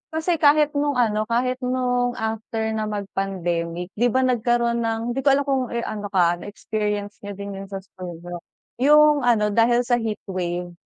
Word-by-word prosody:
kasi 325 +1 0
kahit 300 0 +5
no'ng 290 -1 0
ano 215 -3 +1
kahit 250 +2 0
no'ng 250 -1 0
after 220 0 -3
na 215 -1 -2
mag-pandemic 180 -4 -3
'di 245 - +4
ba, 260 +2 +2
nagkaroon 240 -1 +1
ng, 225 -1 -1
hindi 255 - -2
ko 270 - -3
alam 280 - +1
kung 265 -3 0
ano 215 -3 -3
ka 175 -2 +3
na - - -9
experience 205 -1 -3
niyo 205 0 -7
din 200 +1 -6
'yun 195 - -8
sa 195 -1 -6
school 185 -2 -9
niyo, 175 0 -6 0.4
'yung 300 +2 +6
ano 210 -3 +3
dahil 235 +3 +3
sa 245 0 +2
heatwave 180 -5 -4
225 Hz, 175 wpm, -23 LUFS, 200-250 Hz, 0.4 s, yung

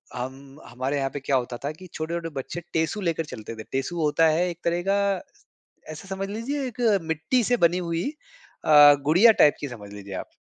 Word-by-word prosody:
हम 135 +3 -7
हमारे 130 +4 -3
यहाँ 135 -1 -1
पे 145 - -4
क्या 135 0 0
होता 125 -1 -1
था 145 - -1
कि 185 +4 -12
छोटे-छोटे 165 +1 -4
बच्चे 165 +6 -6
टेसू 160 +6 0
लेकर 165 -3 -1
चलते 115 -5 -8
थे। 110 - -8
टेसू 135 +6 -2
होता 155 +2 +3
है 160 +3 +2
एक 170 -1 -7
तरह 170 +1 0
का 200 - +3 0.9
ऐसा 155 +5 -10
समझ 195 0 -3
लीजिए 260 +7 -3
एक 250 0 -7 0.2
मिट्टी 160 - 0
से 245 +3 +2
बनी 170 -3 +3
हुई 170 -1 -2 0.6
अ, 145 -1 +9
गुड़िया 180 +10 +7
टाइप 150 - +6
की 145 - -4
समझ 105 -5 -10
लीजिए 100 -1 -9
आप। - - -34
160 Hz, 200 wpm, -25 LUFS, 135-175 Hz, 0.9 s, अ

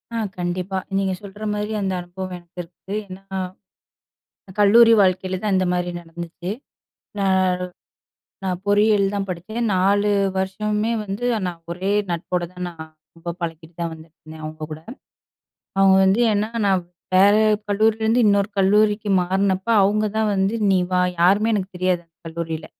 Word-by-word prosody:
ஆ - - -1 0.2
கண்டிப்பா. 180 +2 -2 0.2
நீங்க 195 -1 0
சொல்ற 205 +1 -10
மாரி 210 +1 -3
அந்த 190 -1 -1
அனுபவம் 180 +1 -7
எனக்கு 175 +1 -14
இருக்கு. 180 +3 -11
ஏன்னா, 190 +1 -10 1.4
கல்லூரி 230 +3 +7
வாழ்க்கையில 185 -1 +1
தான் 210 -2 +1
இந்த 185 - +2
மாரி 180 0 -1
நடந்துச்சு. 170 +1 -7 0.7
நா 200 - +1 1.2
நா 190 - 0 0.2
பொறியியல் 205 -1 +3
தான் 200 -1 -2
படிச்சேன். 200 +7 -4
4 200 +2 +2 0.3
வருஷமுமே 210 +3 -1
வந்து 205 +4 -4 0.2
நான் 175 -2 -5
ஒரே 185 +3 -2 0.2
நட்போட 175 +1 -2
தான், 180 0 -6
நான் 160 -2 -9 0.3
ரொம்ப 165 +1 -6
பழகிட்டு 165 -1 -6
தான் 170 -1 -1
வந்துட்டுருந்தேன் 160 0 -13
அவங்க 155 0 -7
கூட. 155 - -6 1.0
அவுங்க 195 -1 +6
வந்து 195 +5 +3
ஏன்னா, 210 +1 0 0.2
நான் 190 -2 +3 0.3
வேற 200 +2 +6 0.3
கல்லூரிலருந்து 220 +3 +2
இன்னொரு 200 -1 +3
கல்லூரிக்கு 210 +2 +3
மாறுனப்ப 190 +2 0 0.2
அவங்க 210 +2 +2
தான் 220 -1 +2
வந்து, 195 +2 +1 0.2
"நீ 190 - +4
வா!" 180 - +2 0.2
யாருமே 200 +6 +4
எனக்கு 195 -2 -2
தெரியாது 185 -1 +1
அந்த 165 0 -48
கல்லூரியில. 165 -1 -5
190 Hz, 140 wpm, -22 LUFS, 175-205 Hz, 1.4 s, கல்லூரி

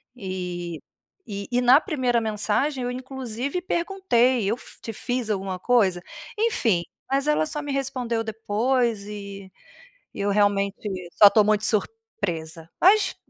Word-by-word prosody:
E 180 -5 -5 0.5
e 200 -1 -5
e 245 - +2
na 250 +4 +7
primeira 255 - 0
mensagem 225 +6 0
eu 245 - -2
inclusive 260 +3 -4
perguntei: 335 - +1
“Eu 225 - +1
fi - - -8
te 225 - -6
fiz 245 +1 -2
alguma 190 -2 -2
coisa?”. 190 -5 +2 0.4
Enfim, 230 - +2 0.3
mas 275 +2 +1
ela 300 +1 +2
só 300 -1 -4
me 290 - -4
respondeu 255 -4 -2
depois 225 0 -1
e 200 -2 -8 0.6
eu 200 +1 -2
realmente 200 -1 +2 0.4
só 205 - +8
estou 215 +1 +5
muito 215 0 +2
surpresa, 175 - -3
mas. 400 +3 +5
225 Hz, 135 wpm, -24 LUFS, 200-265 Hz, 0.6 s, só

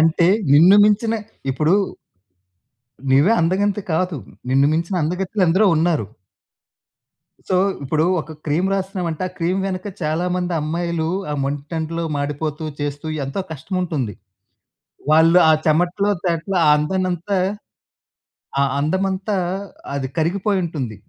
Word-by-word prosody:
అంటే, 165 +1 +3 0.3
నిన్ను 175 +7 +7
మించిన 220 +2 +2 0.4
ఇప్పుడు 155 +7 +2 1.4
నీవే 145 +11 +5
అందగంతి 195 +4 +1
కాదు, 180 -1 0 0.3
నిన్ను 135 +2 +4
మించిన 170 +4 -1
అందగత్తెలెందరో 185 +3 +1
ఉన్నారు! 160 - +1 1.4
సో, 185 - +1 0.3
ఇప్పుడు 155 +4 +1 0.2
ఒక 160 - -11
క్రీమ్ 165 +6 +1
రాస్తున్నామంటే, 185 -4 -3
ఆ - - -17
క్రీమ్ 180 +3 0
వెనక 185 +1 -4
చాలా 155 +3 0
మంది 180 -1 -2
అమ్మాయిలు, 165 +1 -2 0.2
ఆ - - -1
మండుటెండలో 160 +4 -3
మాడిపోతూ, 150 +2 -3 0.2
చేస్తూ 145 +1 -4 0.2
ఎంతో 140 +9 -3
కష్టముంటుంది. 160 - -3 1.0
వాళ్ళు 165 +3 +6
ఆ - - +7
చెమటలో, 175 +6 +2
తేటలో 175 +2 -1 0.2
అందాన్నంతా 185 +4 -1 1.2
ఆ - - +5 0.2
అందం 160 +7 0
అంతా 190 +2 -2 0.6
అది 135 -1 -2
కరిగిపోయుంటుంది. 170 - -1
170 Hz, 110 wpm, -20 LUFS, 155-185 Hz, 1.4 s, నిన్ను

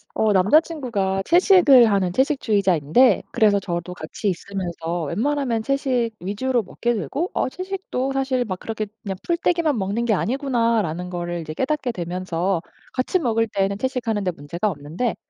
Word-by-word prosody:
어 215 -1 +2
남자 200 +12 +5
친구가 220 - -2
채식을 345 - +6
하는 190 -3 +1
채식주의자인데 210 - +3
그래서 205 -2 +3
저도 175 -1 -4
같이 180 +5 -4
있으면서 175 -2 -4
웬만하면 235 - -1
채식 255 -3 0
위주로 235 +7 -1
먹게 240 +5 -2
되고 225 - -2
'어 - - 0
채식도 370 -6 -4
사실 265 -2 0
막 185 -4 -4
그렇게 220 -1 -4 0.2
그냥 195 -3 -4
풀떼기만 335 -4 +1
먹는 205 +4 -1
게 230 - +2
아니구나.'라는 230 - 0
거를 175 -1 -4
이제 155 -1 -6
깨닫게 265 - -1
되면서 180 -1 -2 0.3
같이 260 +8 0
먹을 225 -6 +1
때에는 195 -1 -1
채식하는 230 -4 -1
데 185 - 0
문제가 170 +6 -3
없는데 160 - -3
215 Hz, 375 characters per minute, -22 LUFS, 180-260 Hz, 0.3 s, 채식을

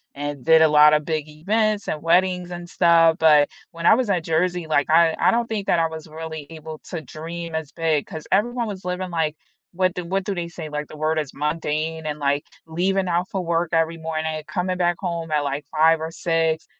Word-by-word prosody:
and 145 -2 -5
did 160 0 +6
a 160 - +7
lot 150 0 +6
of 150 -1 +2
big 155 -2 -2
events 210 +7 -1
and 155 - -3
weddings 180 +1 +2
and 175 0 -7
stuff, 165 -2 +4
but 150 -2 +5 0.2
when 170 0 -7
I - - +8
was 240 -2 +1
at 175 -4 +1
Jersey, 175 +1 0
like, 145 -2 +1
I 165 0 +5
I - - +4
don't 235 0 0
think 210 -3 -3
that 170 - +3
I 165 - +2
was 160 0 -9
really 160 -1 -7
able 160 -1 -9
to 170 - -4
dream 165 +2 -7
as 160 -3 -4
big 160 -3 0
'cause 160 -5 -8
everyone 235 +4 +1
was 195 -3 -7
living, 180 0 -3
like, 160 -2 -1 0.4
what 185 0 +1
do 180 -1 -5
what 190 +2 -1
do 200 - -2
they 175 -2 -4
say, 165 -2 -8
like, 150 0 -4
the - - -11
word 155 +1 0
is 150 -3 -5
mundane 155 +1 -2
and, 150 - -3
like, 145 +1 0 0.2
leaving 185 +4 0
out 175 +2 0
for 190 - -2
work 170 0 0
every 165 0 +1
morning, 160 -1 -3
coming 185 -1 -2
back 175 -1 +2
home 170 -3 -3
at, 150 -1 +1
like, 140 +1 -3
5 160 +1 +4
or 160 - -3
6, 165 -1 0
165 Hz, 225 wpm, -22 LUFS, 155-180 Hz, 0.4 s, I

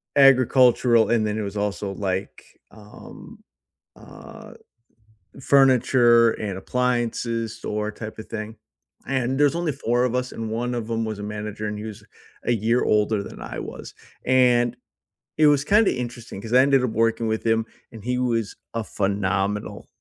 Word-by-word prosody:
agricultural, 130 -3 +5
and 115 -2 +2
then 105 0 -2
it - - -2
was 100 0 -5
also, 100 -1 -2
like, 95 -1 -4 0.3
um, 105 -1 -13 0.6
uh, - - -13 0.9
furniture 125 -3 +4
and 100 -3 -5
appliances 120 -1 -2
or 105 0 -2
type 110 +1 -9
of 110 - -8
thing, 110 0 -6 0.5
and 130 0 -1
there's 145 +2 +4
only 170 -3 -1
4 120 -2 0
of 125 - -1
us, 125 0 -1
and 110 -1 -5
one 120 +2 -2
of 115 -2 -4
'em 115 0 -1
was 110 -2 -4
a - - -7
manager, 105 0 -5
and 105 0 -4
he 105 - -7
was 110 -2 -9 0.4
a - - +1
year 115 +2 +1
older 105 -1 +1
than - - -10
I - - -7
was, - - -9 0.3
and 125 -2 +3 0.6
it 155 -1 +5
was, 145 -2 +3
kinda, 210 +6 +3
interesting 120 -4 -7
'cause 115 +3 -6
I 130 - +7
ended 135 -1 +3
up 125 - 0
working 115 +1 0
with 110 0 -2
him, 115 0 +2 0.3
and 110 -3 -11
he 125 +2 -1
was 115 -4 -1 0.2
a 115 -1 -2
phenomenal 100 0 -2
115 Hz, 165 wpm, -23 LUFS, 105-125 Hz, 0.9 s, I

